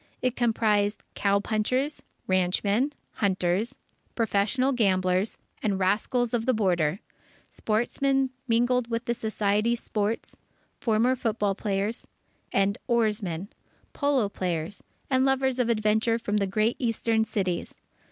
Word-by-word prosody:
It 255 -1 +1
comprised 215 -3 +1
cow 200 0 +2
punchers, 255 +8 0 0.2
ranchmen, 200 +8 +1 0.3
hunters, 190 0 0 0.4
professional 230 +4 +1
gamblers, 190 -4 +1 0.2
and 205 -3 0
rascals 220 +6 +1
of 235 0 0
the 255 - +3
Border, 180 -5 +1 0.5
sportsmen, 265 +4 0 0.2
mingled 240 +1 +2
with 230 +1 -2
the 235 - +1
society 220 0 +1
sports, 215 -1 -2 0.4
former 235 +3 +2
football 215 -5 0
players 200 +3 -2 0.4
and 195 +2 +1
oarsmen, 210 -6 0 0.4
polo 280 -6 +2
players, 180 -1 -3 0.3
and 260 0 +4
lovers 265 -1 +1
of 240 -2 +2
adventure 220 +1 +2
from 210 -2 -1
the 200 -1 +1
great 215 +4 +1
eastern 230 -2 +1
cities. 190 -5 -2
220 Hz, 115 wpm, -27 LUFS, 200-240 Hz, 0.5 s, and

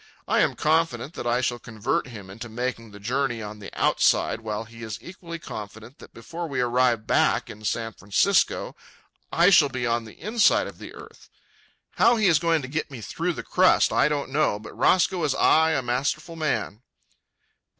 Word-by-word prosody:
I - - +2
am - - +2
confident 155 -3 0
that 120 - -5
I 120 +1 +1
shall 120 -1 -1
convert 110 0 -2
him 100 -6 -10
into 115 +4 -8
making 115 0 -4
the 100 0 -13
journey 120 +2 -1
on 105 0 -8
the 100 - -8
outside, 115 - +2
while 110 -1 -4
he 115 +1 -14
is 110 -2 -5
equally 170 -2 -9
confident 110 -2 -9
that - - -14
before 165 +9 -7
we 135 -4 -3
arrive 125 -2 +2
back - - +1
in 105 - -13
San 115 +1 -2
Francisco 100 -1 +1 0.6
I 175 +3 +4
shall 150 -6 +6
be 125 -2 -3
on 115 -1 0
the 110 - -14
inside 215 +4 +3
of - - -10
the - - -9
earth. - - -14 0.7
How 240 - +5
he 215 -2 +1
is 170 -5 +5
going 165 -3 +1
to - - -5
get 155 +3 -3
me 135 -4 -9
through 165 +10 -3
the - - -7
crust 185 0 +3
I 150 - +3
don't 145 -2 -3
know, 145 -7 +1
but 105 0 -11
Roscoe 180 - +2
is 145 -3 +1
ay 160 0 +4
a 135 - -1
masterful 145 +7 -2
man. 150 -8 -2
125 Hz, 190 wpm, -25 LUFS, 115-160 Hz, 0.7 s, shall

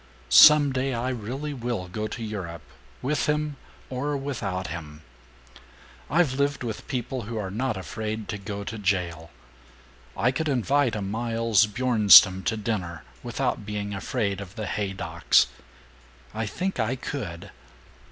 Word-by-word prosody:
Some 150 -2 +8
day 130 0 -1
I 120 +2 -2
really 130 +5 -4
will 120 -7 -3
go 105 +4 -4
to 115 +2 -6
Europe 90 -7 -6 0.4
with 140 +2 0
him... 150 0 0 0.3
or 140 +3 -2
without 120 -10 -3
him. 80 -2 -7 1.1
"I've 165 -4 +3
lived 140 0 0
with 110 -3 -5
people 130 0 -3
who 115 - -4
are 95 -3 -3
not 115 +1 -2
afraid 110 +2 -5
to 105 - -4
go 100 0 -5
to 110 +2 -6
jail. 90 -5 -1 0.9
I 120 +6 +2
could 155 +4 -2
invite 135 -1 +1
a 105 - -3
Miles 115 +1 +1
Bjornstam 105 -4 +6
to 115 -1 0
dinner 95 - -3 0.2
without - - -2
being 105 0 -4
afraid 100 0 -2
of 100 -1 -10
the 110 - -4
Haydocks... 100 -2 +1 0.9
I 110 0 -3
think 185 - -3
I 115 +3 0
could. 100 - -6
110 Hz, 140 wpm, -26 LUFS, 100-130 Hz, 1.1 s, Some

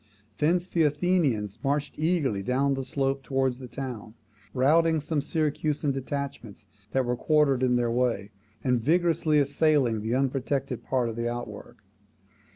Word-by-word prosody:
Thence 170 +4 +2
the 175 -2 -1
Athenians 150 - +1
marched 145 +1 0
eagerly 155 - 0
down 135 +6 +1
the 135 0 -3
slope 135 +1 -1
towards 135 -2 -1
the 130 - -8
town, 120 -4 -7 0.4
routing 160 +6 +3
some 150 0 -1
Syracusan 150 -1 -1
detachments 135 -5 -5 0.2
that 130 +3 0
were 120 0 0
quartered 145 -2 +2
in 125 -1 +3
their 120 -1 +1
way, 115 -5 0 0.3
and 125 -3 +1
vigorously 165 +2 +2
assailing 140 -5 +2
the 110 +3 -1
unprotected 135 -1 -1
part 125 -3 0
of 115 - -4
the 115 0 -1
outwork. 120 0 -7
135 Hz, 145 wpm, -27 LUFS, 125-150 Hz, 0.4 s, routing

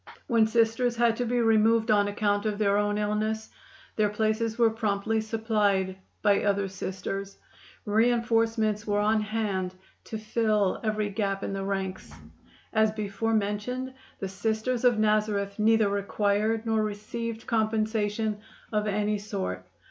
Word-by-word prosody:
When 230 -5 +3
Sisters 230 +2 +2
had 235 -1 +3
to 245 - -1
be 245 +1 +1
removed 225 0 +3
on 205 -1 +4
account 205 +1 0
of 210 -1 -1
their 200 -2 +2
own 205 0 0
illness, 215 +1 -1 0.5
their 210 -1 +3
places 220 +2 0
were 230 -2 +4
promptly 220 0 0
supplied 210 -4 0 0.3
by 205 -2 +3
other 200 -1 +1
Sisters. 195 +1 -5 0.5
Reinforcements 225 -1 +1
were 205 0 +1
on 215 +1 +2
hand 205 -4 -2 0.3
to 220 - -5
fill 215 -2 +1
every 215 -1 -1
gap 195 -1 -2
in - - -3
the 195 0 -3
ranks. 190 -1 -3 0.6
As 220 -1 +3
before 215 +1 -2
mentioned, 220 +5 -2 0.2
the 195 - -4
Sisters 220 +5 -1
of 240 -3 +5
Nazareth 210 -1 +1
neither 220 0 +4
required 205 +2 0
nor 220 -1 +1
received 220 +2 -5
compensation 220 -1 0 0.3
of 210 -1 0
any 210 0 0
sort. 190 - -4
215 Hz, 140 wpm, -27 LUFS, 205-225 Hz, 0.6 s, of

